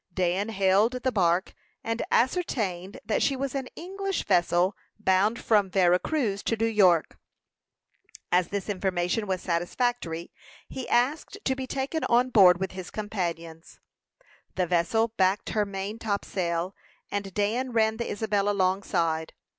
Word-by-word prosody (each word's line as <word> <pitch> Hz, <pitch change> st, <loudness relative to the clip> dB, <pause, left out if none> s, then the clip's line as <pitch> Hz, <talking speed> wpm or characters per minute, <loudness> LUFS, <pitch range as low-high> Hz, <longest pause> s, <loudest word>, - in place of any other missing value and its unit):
Dan 185 Hz, +3 st, 0 dB
hailed 200 Hz, +3 st, +3 dB
the 255 Hz, +1 st, -1 dB
bark, 180 Hz, -3 st, +1 dB, 0.3 s
and 230 Hz, +1 st, -2 dB
ascertained 210 Hz, -, 0 dB
that 215 Hz, -, 0 dB
she 275 Hz, -, +2 dB
was 270 Hz, 0 st, -3 dB
an 270 Hz, -2 st, -3 dB
English 390 Hz, +2 st, -4 dB
vessel, 175 Hz, +2 st, +2 dB, 0.2 s
bound 210 Hz, +2 st, +2 dB
from 205 Hz, -4 st, +2 dB
Vera 180 Hz, -1 st, +3 dB
Cruz 225 Hz, -10 st, -1 dB
to 225 Hz, -, -1 dB
New 225 Hz, -, +1 dB
York. 190 Hz, -7 st, +3 dB, 1.1 s
As 180 Hz, 0 st, +3 dB
this 200 Hz, -2 st, -4 dB
information 190 Hz, +1 st, -1 dB
was 185 Hz, -1 st, -2 dB
satisfactory, 175 Hz, 0 st, -2 dB, 0.4 s
he 260 Hz, -, -6 dB
asked 275 Hz, +10 st, +1 dB
to 265 Hz, -, +1 dB
be 260 Hz, -1 st, -5 dB
taken 275 Hz, +5 st, -2 dB
on 245 Hz, +2 st, +3 dB
board, 180 Hz, -5 st, +7 dB
with 190 Hz, 0 st, -2 dB
his 185 Hz, -1 st, -7 dB
companions. 170 Hz, -6 st, -5 dB, 0.8 s
The 185 Hz, -, +1 dB
vessel 180 Hz, +7 st, +1 dB
backed 190 Hz, +2 st, +2 dB
her 210 Hz, -2 st, 0 dB
main 200 Hz, +3 st, -5 dB
topsail, 185 Hz, -4 st, -2 dB, 0.4 s
and 200 Hz, -1 st, -3 dB
Dan 230 Hz, +5 st, 0 dB
ran 220 Hz, -1 st, +2 dB
the 235 Hz, -, -3 dB
Isabel 205 Hz, -1 st, 0 dB
alongside. 185 Hz, -5 st, 0 dB
200 Hz, 140 wpm, -27 LUFS, 180-230 Hz, 1.1 s, board